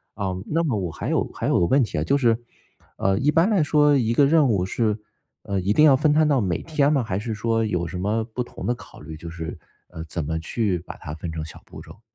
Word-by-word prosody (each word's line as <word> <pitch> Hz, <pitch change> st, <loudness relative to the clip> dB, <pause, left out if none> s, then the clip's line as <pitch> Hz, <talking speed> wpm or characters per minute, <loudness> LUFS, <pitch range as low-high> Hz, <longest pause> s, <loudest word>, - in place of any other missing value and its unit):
啊， 95 Hz, -2 st, -2 dB
那 165 Hz, +6 st, 0 dB
么 130 Hz, -9 st, 0 dB
我 90 Hz, -5 st, -3 dB
还 -, -, -5 dB
有 -, -, +2 dB
还 -, -, -3 dB
有 -, -, +3 dB
个 85 Hz, -, +3 dB
问 135 Hz, +9 st, +3 dB
题 115 Hz, -, -2 dB
啊， -, -, 0 dB
就 140 Hz, -, +2 dB
是， 115 Hz, -4 st, +3 dB, 0.6 s
呃， 95 Hz, 0 st, +1 dB
一 145 Hz, +2 st, +2 dB
般 165 Hz, +7 st, +3 dB
来 195 Hz, -7 st, +3 dB
说 150 Hz, 0 st, +4 dB
一 115 Hz, -2 st, +1 dB
个 140 Hz, +4 st, +5 dB
任 150 Hz, -2 st, +4 dB
务 95 Hz, -4 st, +1 dB
是， 110 Hz, +2 st, -1 dB, 0.4 s
呃， 100 Hz, -2 st, -2 dB
一 95 Hz, -, 0 dB
定 150 Hz, +9 st, +5 dB
要 140 Hz, -, +7 dB
分 145 Hz, +3 st, +2 dB
摊 155 Hz, +1 st, +4 dB
到 140 Hz, -5 st, +3 dB
每 90 Hz, -4 st, -1 dB
天 150 Hz, -2 st, +1 dB
吗？ 140 Hz, -, +2 dB
还 100 Hz, -5 st, -3 dB
是 110 Hz, +2 st, -3 dB
说 115 Hz, +1 st, 0 dB
有 90 Hz, -5 st, -1 dB
什 90 Hz, -, -6 dB
么 105 Hz, +5 st, 0 dB
不 120 Hz, +2 st, -4 dB
同 -, -, -9 dB
的 120 Hz, -, +1 dB
考 -, -, -14 dB
虑， 80 Hz, -, -9 dB
就 85 Hz, +1 st, -9 dB
是， 80 Hz, -1 st, -6 dB, 0.3 s
呃， 80 Hz, -2 st, -8 dB
怎 80 Hz, -1 st, -3 dB
么 80 Hz, +2 st, -2 dB
去 100 Hz, +3 st, -1 dB
把 90 Hz, -, -10 dB
它 75 Hz, -, -7 dB
分 80 Hz, +1 st, -6 dB
成 80 Hz, -1 st, -4 dB
小 80 Hz, -, -11 dB
步 -, -, -11 dB
骤。 -, -, -14 dB
110 Hz, 285 characters per minute, -23 LUFS, 90-140 Hz, 0.6 s, 要